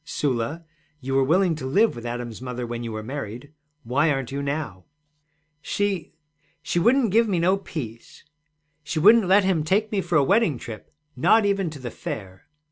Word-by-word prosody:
'Sula, 145 Hz, +1 st, -2 dB, 0.3 s
you 135 Hz, -1 st, -4 dB
were 135 Hz, 0 st, +4 dB
willing 175 Hz, +5 st, +3 dB
to 145 Hz, -4 st, -5 dB
live 205 Hz, +11 st, +3 dB
with 120 Hz, 0 st, -7 dB
Adam's 120 Hz, -1 st, -5 dB
mother 125 Hz, -1 st, -4 dB
when 120 Hz, 0 st, -5 dB
you 115 Hz, -, -5 dB
were 110 Hz, 0 st, -5 dB
married. 130 Hz, +2 st, -7 dB, 0.3 s
Why 140 Hz, +7 st, +1 dB
aren't 135 Hz, -3 st, -1 dB
you 140 Hz, +1 st, -3 dB
now?' 140 Hz, -10 st, -4 dB, 0.8 s
'She 195 Hz, +1 st, -2 dB, 0.5 s
she 175 Hz, -, 0 dB
wouldn't 235 Hz, +3 st, +3 dB
give 230 Hz, +3 st, +4 dB
me 195 Hz, -4 st, 0 dB
no 180 Hz, +3 st, +3 dB
peace. 125 Hz, -, -8 dB, 0.6 s
She 155 Hz, +2 st, -4 dB
wouldn't 210 Hz, +5 st, +6 dB
let 195 Hz, +2 st, +5 dB
him 185 Hz, -5 st, +1 dB
take 205 Hz, +7 st, +1 dB
me 200 Hz, -3 st, 0 dB
for 175 Hz, -2 st, -2 dB
a 145 Hz, -, +4 dB
wedding 190 Hz, -, +2 dB
trip, 110 Hz, -2 st, -9 dB, 0.3 s
not 215 Hz, -, +4 dB
even 200 Hz, -3 st, +1 dB
to 155 Hz, -, -9 dB
the 125 Hz, -3 st, -7 dB
Fair.' 95 Hz, -3 st, -7 dB
150 Hz, 185 wpm, -24 LUFS, 120-190 Hz, 0.8 s, wouldn't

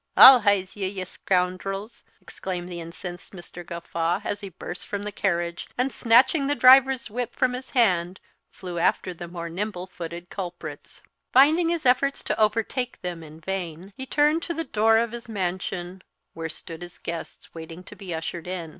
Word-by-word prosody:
"I'll 260 Hz, -1 st, +12 dB
heize 200 Hz, -3 st, +1 dB
ye, 195 Hz, -2 st, -2 dB
ye 190 Hz, -1 st, -4 dB
scoundrels!" 190 Hz, +4 st, -2 dB, 0.2 s
exclaimed 180 Hz, -1 st, -6 dB
the 170 Hz, -1 st, -6 dB
incensed 175 Hz, +2 st, -8 dB
Mr. 175 Hz, -1 st, -10 dB
Gawffaw, 170 Hz, 0 st, -2 dB
as 205 Hz, -, -3 dB
he 200 Hz, -, -6 dB
burst 180 Hz, 0 st, -8 dB
from 205 Hz, 0 st, -3 dB
the 210 Hz, -, -4 dB
carriage; 170 Hz, -4 st, -1 dB
and, 255 Hz, +2 st, +1 dB
snatching 255 Hz, +6 st, +4 dB
the 290 Hz, -, +1 dB
driver's 265 Hz, -2 st, +6 dB
whip 245 Hz, +1 st, -3 dB
from 255 Hz, -2 st, +2 dB
his 255 Hz, +1 st, -6 dB
hand, 180 Hz, -5 st, +2 dB, 0.3 s
flew 180 Hz, -2 st, -6 dB
after 180 Hz, +2 st, +1 dB
the 175 Hz, 0 st, -8 dB
more 170 Hz, -1 st, -6 dB
nimble 180 Hz, +1 st, -4 dB
footed 175 Hz, -1 st, -8 dB
culprits. 180 Hz, -3 st, -7 dB, 0.3 s
Finding 310 Hz, +6 st, +5 dB
his 335 Hz, -3 st, -1 dB
efforts 260 Hz, +2 st, +2 dB
to -, -, -2 dB
overtake 225 Hz, +4 st, 0 dB
them 175 Hz, -2 st, -4 dB
in 155 Hz, 0 st, -12 dB
vain, 185 Hz, +1 st, -5 dB
here 265 Hz, -, -7 dB
turned 300 Hz, +4 st, +3 dB
to 340 Hz, 0 st, -4 dB
the 330 Hz, -, -2 dB
door 225 Hz, -5 st, +3 dB
of 230 Hz, 0 st, +1 dB
his 235 Hz, -1 st, -8 dB
mansion, 185 Hz, -2 st, -3 dB, 0.3 s
where 165 Hz, -1 st, -5 dB
stood 165 Hz, +1 st, -8 dB
his 175 Hz, -1 st, -9 dB
guests, 170 Hz, 0 st, -7 dB
waiting 165 Hz, +2 st, -9 dB
to -, -, -12 dB
be 190 Hz, -3 st, -8 dB
ushered 165 Hz, +1 st, -4 dB
in. 180 Hz, -3 st, -4 dB
190 Hz, 180 wpm, -25 LUFS, 175-235 Hz, 0.3 s, I'll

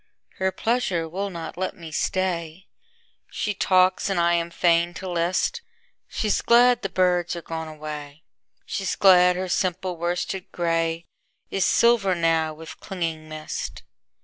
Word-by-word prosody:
Her 190 Hz, 0 st, +1 dB
pleasure 190 Hz, -5 st, -1 dB
will 195 Hz, +5 st, -3 dB
not 170 Hz, -3 st, -7 dB
let 185 Hz, -, -2 dB
me 165 Hz, -3 st, -9 dB
stay. 175 Hz, +1 st, -2 dB, 0.6 s
She 210 Hz, -, -2 dB
talks 185 Hz, 0 st, +3 dB
and 195 Hz, -3 st, 0 dB
I 170 Hz, 0 st, +3 dB
am 170 Hz, 0 st, 0 dB
fain 170 Hz, 0 st, +2 dB
to 190 Hz, -, -6 dB
list:She's 220 Hz, -, -2 dB
glad 245 Hz, +1 st, +5 dB
the 195 Hz, -, -3 dB
birds 180 Hz, -1 st, +1 dB
are 170 Hz, -, -7 dB
gone 160 Hz, -1 st, -5 dB
away, 150 Hz, -1 st, -8 dB, 0.4 s
She's 195 Hz, -2 st, -2 dB
glad 180 Hz, -2 st, +6 dB
her 185 Hz, +1 st, -3 dB
simple 185 Hz, 0 st, -1 dB
worsted 175 Hz, +2 st, -3 dB
grayIs 165 Hz, -1 st, -1 dB, 0.6 s
silver 230 Hz, -6 st, +3 dB
now 165 Hz, -2 st, +1 dB
with 160 Hz, +1 st, -11 dB
clinging 165 Hz, -4 st, -4 dB
mist. 155 Hz, 0 st, -6 dB
175 Hz, 135 wpm, -24 LUFS, 165-190 Hz, 0.6 s, glad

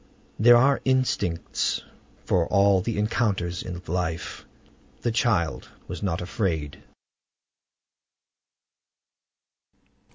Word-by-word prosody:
There 120 Hz, +2 st, +8 dB
are 135 Hz, +3 st, +3 dB
instincts 120 Hz, -10 st, 0 dB, 0.4 s
for 85 Hz, -3 st, +2 dB
all 100 Hz, -1 st, +4 dB
the 115 Hz, +3 st, -3 dB
encounters 105 Hz, -5 st, 0 dB
of 90 Hz, 0 st, -8 dB
life. 85 Hz, -1 st, -3 dB, 0.5 s
The 120 Hz, -, 0 dB
child 110 Hz, -, 0 dB, 0.2 s
was 90 Hz, -, -6 dB
not 90 Hz, -5 st, -1 dB
afraid. 85 Hz, -6 st, -2 dB
95 Hz, 85 wpm, -25 LUFS, 85-115 Hz, 0.5 s, There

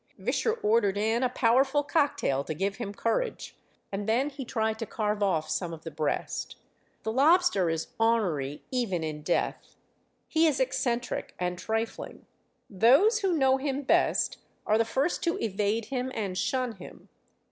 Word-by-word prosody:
Visscher 450 Hz, 0 st, 0 dB
ordered 210 Hz, -2 st, +3 dB
in 220 Hz, +3 st, +1 dB
a 255 Hz, -, +2 dB
powerful 265 Hz, +4 st, +3 dB
cocktail 285 Hz, -, +1 dB
to 155 Hz, -, -4 dB
give 195 Hz, +4 st, -2 dB
him 225 Hz, -4 st, -4 dB
courage, 230 Hz, -, -2 dB, 0.4 s
and 200 Hz, +2 st, -3 dB
then 260 Hz, +6 st, +1 dB
he 275 Hz, -1 st, -6 dB
tried 220 Hz, -2 st, -1 dB
to 225 Hz, -, -4 dB
carve 210 Hz, -1 st, -2 dB
off 170 Hz, -6 st, +1 dB
some 175 Hz, -3 st, -2 dB
of 160 Hz, 0 st, -10 dB
the 165 Hz, -, -6 dB
breast. 155 Hz, 0 st, -3 dB, 0.5 s
The 220 Hz, -, -1 dB
lobster 280 Hz, -, +4 dB
is 165 Hz, 0 st, -2 dB
honery 180 Hz, -12 st, +1 dB
even 220 Hz, -10 st, -1 dB
in 155 Hz, -1 st, -4 dB
death. 170 Hz, +3 st, -2 dB, 0.5 s
He 325 Hz, 0 st, +3 dB
is 295 Hz, -4 st, +1 dB
eccentric 255 Hz, -2 st, -1 dB
and 180 Hz, 0 st, -2 dB
trifling. 225 Hz, +3 st, -4 dB, 0.4 s
Those 270 Hz, -, +4 dB
who 385 Hz, -3 st, +1 dB
know 265 Hz, -2 st, +4 dB
him 275 Hz, +1 st, -2 dB
best 265 Hz, -, +2 dB, 0.3 s
are 215 Hz, +1 st, +3 dB
the 230 Hz, -, +3 dB
first 270 Hz, +8 st, 0 dB
to 335 Hz, -, +1 dB
evade 210 Hz, +1 st, -1 dB
him 260 Hz, +1 st, -3 dB
and 200 Hz, -4 st, -3 dB
shun 245 Hz, +3 st, -1 dB
him. 185 Hz, -, -13 dB
225 Hz, 160 wpm, -28 LUFS, 195-265 Hz, 0.5 s, lobster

